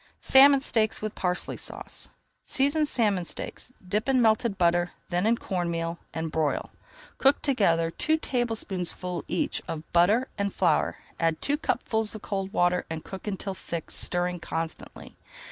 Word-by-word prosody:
SALMON 275 Hz, +1 st, +7 dB
STEAKS 220 Hz, -5 st, +1 dB
WITH 215 Hz, 0 st, -2 dB
PARSLEY 180 Hz, -1 st, -1 dB
SAUCE -, -, -6 dB, 0.3 s
Season 290 Hz, +3 st, +2 dB
salmon 210 Hz, -9 st, +2 dB
steaks, 210 Hz, -, -7 dB, 0.2 s
dip 210 Hz, +7 st, -1 dB
in 260 Hz, -1 st, +4 dB
melted 220 Hz, -2 st, +3 dB
butter, 175 Hz, 0 st, +2 dB, 0.2 s
then 180 Hz, +3 st, +1 dB
in 235 Hz, +1 st, +3 dB
corn 180 Hz, -5 st, -2 dB
meal, 165 Hz, 0 st, -3 dB
and 160 Hz, -1 st, -4 dB
broil. 155 Hz, -2 st, -1 dB, 0.5 s
Cook 275 Hz, +1 st, +5 dB
together 170 Hz, -, +2 dB
two 315 Hz, -, +1 dB
tablespoonfuls 195 Hz, -, -2 dB
each 175 Hz, -, -1 dB
of 155 Hz, -1 st, -4 dB
butter 205 Hz, +9 st, +4 dB
and 200 Hz, 0 st, 0 dB
flour, 170 Hz, -5 st, +2 dB, 0.2 s
add 165 Hz, -1 st, +1 dB
two 285 Hz, -, +1 dB
cupfuls 220 Hz, -7 st, -1 dB
of 215 Hz, -, -8 dB
cold 195 Hz, -1 st, -3 dB
water, 180 Hz, -3 st, +2 dB
and 160 Hz, -1 st, -5 dB
cook 190 Hz, +2 st, -8 dB
until 195 Hz, -1 st, -3 dB
thick, 170 Hz, -3 st, -6 dB
stirring 180 Hz, 0 st, -1 dB
constantly. 165 Hz, 0 st, -6 dB
190 Hz, 150 wpm, -27 LUFS, 170-230 Hz, 0.5 s, SALMON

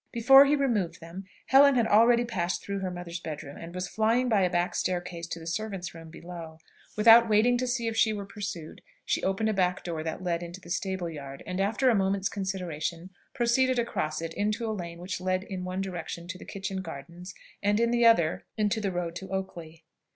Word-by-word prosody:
Before 270 Hz, +4 st, +7 dB
he 290 Hz, +1 st, +3 dB
removed 230 Hz, -, 0 dB
them, 170 Hz, +4 st, -9 dB, 0.2 s
Helen 275 Hz, +1 st, +6 dB
had 235 Hz, -2 st, +3 dB
already 235 Hz, +3 st, +5 dB
passed 185 Hz, -7 st, -2 dB
through 200 Hz, 0 st, -3 dB
her 190 Hz, -1 st, -2 dB
mother's 175 Hz, -1 st, -6 dB
bed 155 Hz, -3 st, -6 dB
room, 140 Hz, 0 st, -10 dB
and 170 Hz, +1 st, -9 dB
was 180 Hz, 0 st, -3 dB
flying 230 Hz, +3 st, +1 dB
by 210 Hz, -4 st, +3 dB
a 180 Hz, -, +3 dB
back 175 Hz, 0 st, 0 dB
staircase 175 Hz, -2 st, -3 dB
to 170 Hz, -, -5 dB
the 165 Hz, -, -10 dB
servants' 190 Hz, +1 st, -4 dB
room 165 Hz, -1 st, -11 dB
below. 170 Hz, -1 st, -9 dB, 0.4 s
Without 230 Hz, +2 st, +7 dB
waiting 220 Hz, +4 st, +4 dB
to 255 Hz, -, -1 dB
see 240 Hz, -1 st, -1 dB
if 225 Hz, -, -2 dB
she 225 Hz, 0 st, +3 dB
were 205 Hz, -2 st, -4 dB
pursued, 190 Hz, -6 st, -7 dB, 0.2 s
she -, -, 0 dB
opened 195 Hz, +3 st, 0 dB
a -, -, +1 dB
back 180 Hz, -2 st, 0 dB
door 165 Hz, -3 st, -4 dB
that 160 Hz, +3 st, -5 dB
led 170 Hz, -2 st, -1 dB
into 175 Hz, +2 st, -8 dB
the 175 Hz, -2 st, -12 dB
stable 190 Hz, 0 st, -2 dB
yard, 140 Hz, -4 st, -8 dB
and, 185 Hz, +1 st, -2 dB
after 215 Hz, +7 st, +1 dB
a 250 Hz, -, +6 dB
moment's 195 Hz, -1 st, +1 dB
consideration, 180 Hz, -3 st, -4 dB, 0.2 s
proceeded 255 Hz, +1 st, +2 dB
across 160 Hz, -9 st, -2 dB
it, 165 Hz, 0 st, -5 dB
into 215 Hz, +3 st, -1 dB
a 220 Hz, -, -1 dB
lane 170 Hz, -4 st, -6 dB
which 180 Hz, +1 st, -5 dB
led 185 Hz, 0 st, 0 dB
in 190 Hz, -2 st, -6 dB
one 185 Hz, +1 st, -3 dB
direction 175 Hz, -2 st, -5 dB
to 185 Hz, 0 st, -6 dB
the -, -, -11 dB
kitchen 190 Hz, -1 st, -4 dB
gardens, 170 Hz, +3 st, -9 dB, 0.3 s
and 205 Hz, +1 st, +2 dB
in 235 Hz, 0 st, +2 dB
the 240 Hz, 0 st, +2 dB
other 225 Hz, -9 st, +4 dB
into 215 Hz, +1 st, +1 dB
the 200 Hz, -2 st, -1 dB
road 175 Hz, -2 st, -3 dB
to 190 Hz, -, -9 dB
Oakley. 170 Hz, -4 st, -6 dB
190 Hz, 215 wpm, -28 LUFS, 170-220 Hz, 0.4 s, Before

